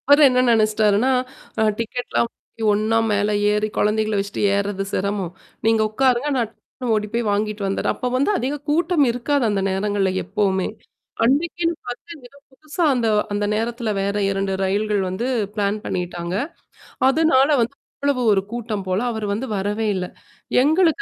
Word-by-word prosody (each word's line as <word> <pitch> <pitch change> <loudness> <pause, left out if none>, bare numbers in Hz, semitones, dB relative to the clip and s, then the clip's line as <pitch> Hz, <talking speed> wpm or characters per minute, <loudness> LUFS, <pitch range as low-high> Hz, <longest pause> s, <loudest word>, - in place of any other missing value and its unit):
அவரு 285 +1 +7
என்ன 250 0 +3
நினைச்சிட்டாருன்னா, 215 +2 +3 0.5
அ - - +4 0.2
டிக்கெட்லாம் 235 +1 -1
வாங்கி 225 - -12
ஒண்ணா 215 +2 +1
மேல 205 0 +1 0.2
ஏறி 210 +1 +1
குழந்தைகள 215 0 +1
வச்சிட்டு 200 +1 -3
ஏறுறது 200 -1 -1
சிரமம். 195 -2 -2 0.3
நீங்க 225 0 +4
உக்காருங்க. 255 +4 +2
நான் 235 -3 +1
டக்குனு 235 +1 -5
ஓடிப்போய் 215 +1 -1
வாங்கிட்டு 210 0 -1
வந்துடறேன். 195 - -1
அப்போ 250 - -3
வந்து 280 +10 +2
அதிக 285 +1 -2
கூட்டம் 320 -1 +3
இருக்காது, 255 +3 0
அந்த 200 -2 0
நேரங்கள்ல 195 0 0
எப்பவுமே. 190 -2 0 0.6
அன்னைக்கு 320 +7 +1 0.2
பாத்தீங்கன்னா, 260 +2 -8
எதோ 280 - -19
புதுசா 310 +5 -2 0.5
அந்த 205 0 0
நேரத்துல, 230 +1 -2
வேற 200 +1 -1
2 195 0 -1
ரயில்கள் 205 +1 +1
வந்து 200 +7 -3 0.3
பிளான் 205 0 0
பண்ணிட்டாங்க. 175 -1 -3 0.7
அதனால 275 -2 +4
வந்து 235 +4 -1 0.3
அவ்வளவு 280 -3 +1
ஒரு 195 - +2
கூட்டம் 225 -4 -3
போல. 185 +1 +1
அவரு 220 -2 -4
வந்து 225 +6 -3
வரவே 205 +3 -1
இல்ல. 185 -1 -2 0.6
எங்களுக்கு 320 +4 +3
220 Hz, 145 wpm, -21 LUFS, 205-255 Hz, 0.7 s, அவரு